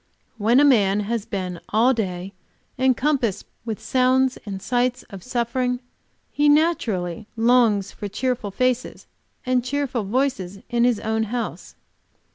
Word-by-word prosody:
When 230 +5 +4
a - - +6
man 210 -7 +4
has 225 +1 -2
been 185 -4 -4
all 235 +5 +4
day 190 -4 -3 0.5
encompassed 260 -4 +1 0.2
with 220 -3 -4
sounds 260 0 +2
and 195 -1 -4
sights 245 +4 0
of 195 -2 -8
suffering, 250 +2 -1 0.5
he 295 0 +3
naturally 225 - +1
longs 225 -4 +3
for 205 - -6
cheerful 245 +1 -2
faces 255 +4 -1 0.4
and 255 -1 +1
cheerful 265 -2 -2
voices 200 -4 -1
in 240 0 +2
his 245 -4 +2
own 220 0 0
house. 235 +2 -5
235 Hz, 130 wpm, -23 LUFS, 205-255 Hz, 0.5 s, a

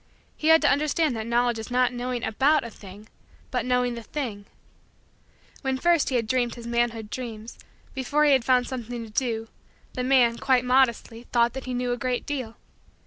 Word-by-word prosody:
He 310 - -3
had 320 0 +6
to - - +5
understand 300 -1 +1
that 220 0 -4
Knowledge 240 0 +1
is 220 - -7
not 250 0 +2
knowing 245 0 -3
about 275 +8 +2
a 235 - -7
thing 205 +1 -13 0.4
but - - -1
knowing 250 -1 +1
the 235 - -6
thing. 220 -5 -5 1.1
When 265 -1 -1
first 340 +1 +2
he 260 - -1
had 235 -2 +1
dreamed 240 +1 0
his 235 -1 -10
manhood 235 -2 -1
dreams, 230 -3 -7 0.3
before 285 +3 +1
he 295 - +5
had 265 -3 +4
found 250 0 +3
something 240 -2 -5
to 220 - -13
do, 225 -1 -1 0.5
the 250 - -3
man, 250 -3 +3
quite 255 -2 +2
modestly, 245 -2 +1
thought 235 -1 +3
that 265 0 -6
he 255 -1 -3
knew 245 0 -1
a 245 - -1
great 250 0 -2
deal. 255 -6 -4
245 Hz, 195 wpm, -25 LUFS, 230-260 Hz, 1.1 s, had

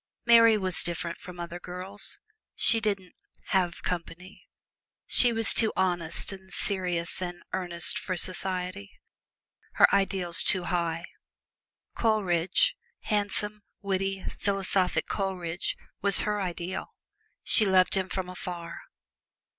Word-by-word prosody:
Mary 230 -2 +7
was 185 -3 -1
different 170 0 0
from 180 -1 -11
other 175 0 -6
girls: 185 +3 -5 0.4
she 230 - +3
didn't 200 -4 -3 0.4
"have 180 -3 0
company," 180 +2 -6 0.6
she 245 - +5
was 225 -1 +6
too 220 -2 +4
honest 175 -2 0
and 190 -1 -11
serious 180 -4 -1
and 175 -1 -5
earnest 175 -2 -1
for 185 -2 -4
society 185 +2 -2 0.8
her - - +7
ideals 190 -3 +2
too 185 -3 +3
high. 170 -2 -1 0.9
Coleridge 210 - +2 0.3
handsome, 210 0 -1 0.2
witty, 195 0 -2 0.2
philosophic 195 -2 +1
Coleridge 185 -3 -3 0.2
was 200 -1 +5
her 210 -1 -1
ideal. 180 0 -4 0.6
She 220 - +4
loved 190 -2 +3
him 190 -1 +1
from 190 -2 -3
afar. 175 -2 -7
185 Hz, 115 wpm, -27 LUFS, 175-200 Hz, 0.9 s, Mary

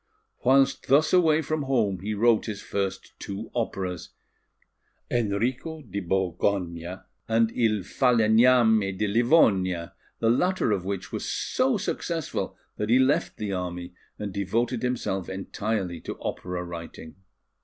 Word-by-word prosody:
Whilst 135 +1 +3
thus 150 +5 +4
away 160 -3 +4
from 155 +1 -2
home, 115 -9 0
he 105 +3 -3
wrote 115 +1 +3
his 105 -2 -4
first 95 -1 -3
two 100 +3 -6
operas, 95 -7 -3 1.0
Enrico 120 +8 -1
di 100 - -5
Borgogna 90 -1 -1 0.2
and 115 0 +2
Il 110 -5 +1
Falegname 110 -3 +4
de 105 - 0
Livonia, 100 - +3 0.2
the 115 - +2
latter 180 -1 +1
of 95 -3 -1
which 100 -1 -4
was - - -4
so 255 -2 +1
successful 170 -5 -3 0.2
that 105 - -2
he 120 - +6
left 130 +2 +2
the 105 -2 -3
army 90 -1 -4 0.2
and 105 -2 -5
devoted 115 +5 -1
himself 115 -7 -2
entirely 95 -2 -3
to - - -7
opera 90 -1 -4
writing. 85 -1 -9
105 Hz, 130 wpm, -26 LUFS, 95-125 Hz, 1.0 s, he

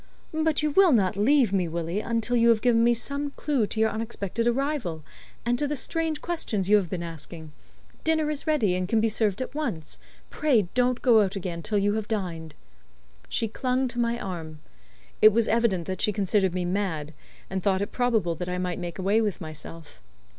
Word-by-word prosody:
"But 315 -1 +1
you 300 - +1
will 375 +2 +5
not 195 -6 +2
leave 235 +1 +3
me, 185 -3 +1
Willie, 170 +3 -3
until 230 +2 0
you 235 0 +4
have 225 -2 +3
given 235 -2 +4
me 240 0 +4
some 280 +4 -2
clue 275 -8 0
to 220 - -4
your 220 0 +3
unexpected 225 0 -3
arrival, 240 - -1 0.4
and 240 +1 +1
to 290 - +2
the 295 - -2
strange 320 +2 -2
questions 230 - -2
you 210 +1 +6
have 190 -5 -1
been 175 -3 -3
asking? 160 -1 -8 0.5
Dinner 315 -1 +2
is 300 +1 -3
ready, 240 -12 +2
and 180 0 -1
can 225 - +3
be 225 +1 +2
served 215 +1 0
at - - -9
once. 235 - -4 0.3
Pray 270 -9 +2
don't 250 0 +1
go 235 -5 +6
out 195 0 -1
again 175 -3 -4
till 210 +3 -1
you 205 +1 +2
have 215 -1 -2
dined." 170 -7 -4 0.7
She 225 - 0
clung 255 +4 -1
to 240 - -5
my 235 0 0
arm. 165 -6 -6 0.6
It 215 - +9
was 230 0 +2
evident 220 -7 +1
that 185 +1 -4
she 210 - +2
considered 195 -2 +1
me 180 -1 -1
mad, 175 -5 -2 0.3
and 190 0 -3
thought 190 +1 +1
it - - -6
probable 230 -8 +1
that 180 +2 -5
I 180 - -2
might 180 -1 -2
make 175 -2 -5
away 200 +4 +2
with 210 -4 -1
myself. 155 - -9
215 Hz, 205 wpm, -26 LUFS, 180-245 Hz, 0.7 s, It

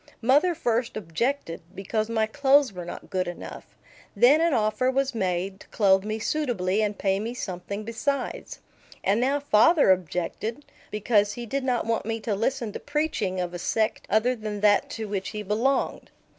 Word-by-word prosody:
Mother 295 +9 +4
first 235 -7 -1
objected, 210 - -2
because 215 +3 -2
my 220 -1 +1
clothes 275 +1 +3
were 180 -2 -7
not 175 - -9
good 185 -2 0
enough. 175 - -8 0.5
Then 285 +6 +6
an 335 0 +3
offer 235 +1 +1
was 270 0 0
made 190 -2 -2
to - - -15
clothe 195 -3 +3
me 215 +1 -3
suitably 220 -7 0
and 210 -1 -1
pay 195 -1 +1
me 230 +4 -4
something 200 0 -5
besides. 250 +4 -3 0.4
And 205 +4 +2
now 275 +3 +2
father 285 - +5
objected, 185 - -2 0.2
because 210 -1 +2
he 240 - -6
did 275 +4 -2
not 250 -2 0
want 230 -1 -1
me 225 0 -2
to 215 - -1
listen 230 +2 -1
to - - -6
preaching 290 -11 -1
of 180 -1 -3
a 175 - -5
sect 220 +4 -1
other 235 +4 +2
than 215 -3 -5
that 205 -1 +4
to 225 - -5
which 200 -2 -3
he 210 0 -5
belonged. 235 +7 0
220 Hz, 175 wpm, -26 LUFS, 195-255 Hz, 0.5 s, Then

